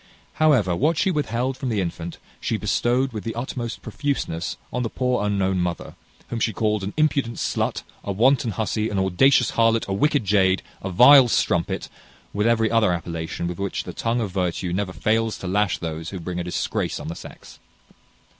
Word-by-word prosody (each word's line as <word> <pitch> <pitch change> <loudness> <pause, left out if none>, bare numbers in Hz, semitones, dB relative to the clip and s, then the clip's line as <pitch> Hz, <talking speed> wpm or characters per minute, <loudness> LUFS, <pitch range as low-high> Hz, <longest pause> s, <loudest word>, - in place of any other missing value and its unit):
However, 125 - +4
what 155 - +1
she 190 - +2
withheld 130 -4 -1
from 130 - -3
the 110 -3 0
infant, 85 -2 -4 0.2
she - - -1
bestowed 125 +2 0
with 105 - -5
the 115 - -4
utmost 120 -1 -5
profuseness 135 - -3 0.2
on 125 - -1
the 115 - -1
poor 125 -3 0
unknown 95 -2 0
mother, 90 -1 -3 0.4
whom 120 - -3
she 110 0 0
called 105 -1 0
an 100 - -5
impudent 140 -6 +1
slut, - - -1 0.2
a 100 - -3
wanton 125 +5 +3
hussy, 110 +1 -1
an 100 - -3
audacious 110 +7 +3
harlot, 115 0 +2
a 95 - -1
wicked 145 +3 +1
jade, 95 -1 +3 0.2
a 95 - -4
vile 125 +7 +8
strumpet, 95 -3 0 0.5
with 105 +2 +1
every 115 -1 +2
other 115 -4 +3
appellation 85 -1 -4
with 85 +1 -4
which 100 0 -2
the - - -7
tongue 115 +1 -1
of 105 -4 -3
virtue 90 -1 -2
never 95 0 -1
fails 110 +3 0
to - - -9
lash 100 +1 +1
those 80 -1 -5
who 95 - -6
bring 90 +1 -4
a - - -2
disgrace 90 - -2
on - - -7
the 80 - -3
sex. - - -12
105 Hz, 190 wpm, -23 LUFS, 95-120 Hz, 0.5 s, vile